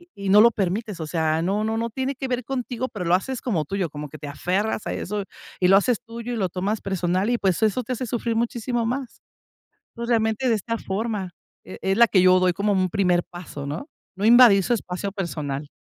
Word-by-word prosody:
y 345 - -21
y 200 -1 -5
no 205 +2 +8
lo 235 +2 +7
permites. 200 0 -2
O 160 - -3
sea, 160 -1 0
no 200 +5 0
no 220 0 -1
no 230 +1 -2
tiene 265 +4 -2
que 265 0 -5
ver 250 -1 -2
contigo, 255 -1 -3
pero 205 -7 -6
lo 175 - +4
haces 255 +6 -4
como 175 -11 0
tuyo, 190 0 -2
como 150 0 -7
que 155 - -10
te 145 - -7
aferras 190 +9 -1
a - - -2
eso 205 +2 -3 0.4
y 180 - +4
lo 195 - +7
haces 230 +3 +2
tuyo 235 +1 -7
y - - -3
lo 195 -4 0
tomas 195 +5 -2
personal 185 +2 0
y, 240 - +1
pues, 190 -1 0
eso 220 +4 +1
te 255 - -4
hace 255 +1 -4
sufrir 230 0 -2
muchísimo 235 0 -1
más. 255 +1 -4 0.7
Entonces, 235 0 -5
realmente, 220 +2 +1
de 230 - +3
esta 230 +3 -3
forma 200 -2 -3 0.3
e - - -9
es 195 0 +1
la 235 +1 +6
que 190 - +4
yo 185 0 +6
doy 185 -1 +3
como 205 +3 0
un 185 -2 +1
primer 180 -3 +2
paso, 175 -5 -9
¿no? 150 - -5 0.3
No 195 - -3
invadir 235 -4 +8
su 240 - +2
espacio 195 -2 -4
personal. 150 -7 -4
205 Hz, 235 wpm, -24 LUFS, 180-235 Hz, 0.7 s, no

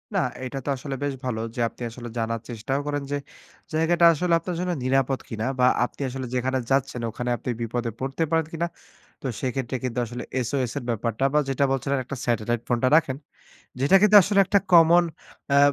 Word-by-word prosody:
না - - +3 0.2
এইটা 130 +2 -5
তো - - -2
আসলে 135 +1 -5
বেশ 145 -1 -1
ভালো 120 -3 -2 0.2
যে, - - -6
আপনি - - -20
আসলে 120 +1 -8
জানার 115 0 -1
চেষ্টাও 120 +4 -2
করেন 145 -1 -2
যে, 145 - +1 0.6
জায়গাটা 170 +2 +3
আসলে 170 +3 0
আপনার 175 +1 -4
জন্য 180 0 -1
নিরাপদ 135 0 +1
কিনা? 110 -1 -3
বা 125 - +5 0.2
আপনি - - -10
আসলে 130 +1 -5
যেখানে 130 +1 0
যাচ্ছেন, 135 -2 +1
ওখানে 125 +3 -4
আপনি - - -6
বিপদে 115 +1 -2
পড়তে 135 +5 -2
পারেন 160 -1 +2
কিনা? 170 +1 -1 0.6
তো - - -2
সেক্ষেত্রে 130 -1 -2
কিন্তু 125 -1 -2
আসলে 120 +2 -6 0.2
SOS 130 -2 -1
এর 140 - -3
ব্যাপারটা 115 +2 -1
বা, 150 - +5
যেটা 135 +1 +1
বলছিলেন 135 +1 0
একটা 135 +2 -6
স্যাটেলাইট 120 0 0
ফোনটা 120 +1 +2
রাখেন। 140 -5 +2 0.6
যেটা 140 +8 +5
কিন্তু 210 0 +7
আসলে 200 +2 +1
একটা 200 - +4
কমন 170 +1 +7 0.5
অ্যা 140 - +5
135 Hz, 190 wpm, -25 LUFS, 120-150 Hz, 0.6 s, কিন্তু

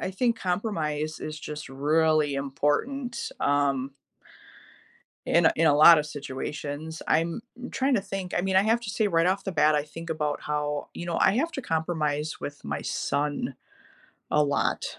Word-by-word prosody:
I - - -2
think 230 +4 0
compromise 160 -6 -2
is 155 0 -5
just 150 -1 -7
really 150 +2 +2
important 150 - -1
um... 140 -2 +1 1.3
in 170 -1 +4
a - - +5
in 165 0 +3
a 145 - +5
lot 160 +2 +9
of 150 - -1
situations. 145 +2 -6
I'm 165 +6 +1 0.3
trying 270 0 +1
to 220 - +2
think, 195 -2 -5
I - - +3
mean, 190 +1 0
I 190 - +6
have 225 +3 +2
to 225 -3 -5
say 215 +1 +1
right 165 -4 +2
off 190 +2 0
the 195 - -3
bat, 155 -2 +4
I 145 - 0
think 165 +2 -9
about 150 -2 -1
how 150 -1 -2
you 175 - -6
know, 170 - -2
I 190 - +5
have 325 +6 0
to 270 - -5
compromise 155 -3 -1
with 145 0 -7
my 70 0 -3
son 145 -1 -2 0.8
a 150 - +3
lot. 140 -1 0
155 Hz, 175 wpm, -27 LUFS, 145-185 Hz, 1.3 s, lot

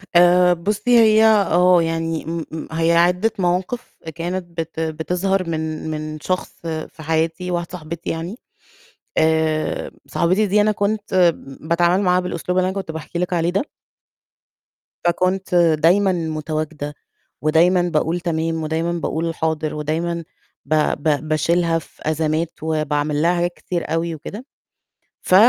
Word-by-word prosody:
آآ 180 +1 +6
بُصّي 210 +7 -1
هي 220 -1 +6
آه، 180 -5 +5
يعني 165 0 -2
م 165 0 -3
م 160 0 -6
هي 165 +1 +2
عدّة 180 +6 +3
مواقِف 185 +7 -1
آآ - - -5
كانت 175 +3 -4
بت 165 0 -4
بتظهر 175 +4 -1
من 160 -1 -3
من 155 0 -5
شخص 185 +4 -2 0.2
في 160 -1 -5
حياتي 165 +3 -1
واحدة 170 -1 -1
صاحبتي 170 -2 -6
يعني، 170 +7 -4 0.8
آآ 160 -1 +1 0.2
صاحبتي 185 +5 +1
دي 205 +2 +3
أنا 215 +1 +3
كنت 200 -4 +2
م 135 +3 -12
باتعامل 175 +3 +3
معاها 180 -1 +3
بالأسلوب 180 0 -3
اللي 185 0 +3
أنا 190 - -5
كنت 190 -4 -4
باحكي 160 +2 -6
لِك 180 0 -1
عليه 170 -1 +1
ده 200 +9 0 1.4
فكنت 185 +2 +1
دايمًا 175 +4 +4
مُتواجدة 155 -3 -3 0.5
ودايمًا 170 +4 +4
باقول 170 0 0
تمام 165 -2 -1
ودايمًا 160 +2 -1
باقول 165 -1 -2
حاضر 160 -1 -1
ودايمًا 165 +3 -2 0.4
ب 155 - -1 0.2
ب 150 +1 0
باشيلها 165 +2 +2
في - - -19
أزمات 160 +1 0
وباعمل 150 -1 0
لها 170 +2 +3
حاجات 175 0 0
كتير 170 -3 -4
أوي 165 0 -1
وكده، 205 - -8 0.8
ف 185 - 0
170 Hz, 140 wpm, -20 LUFS, 160-180 Hz, 1.4 s, آآ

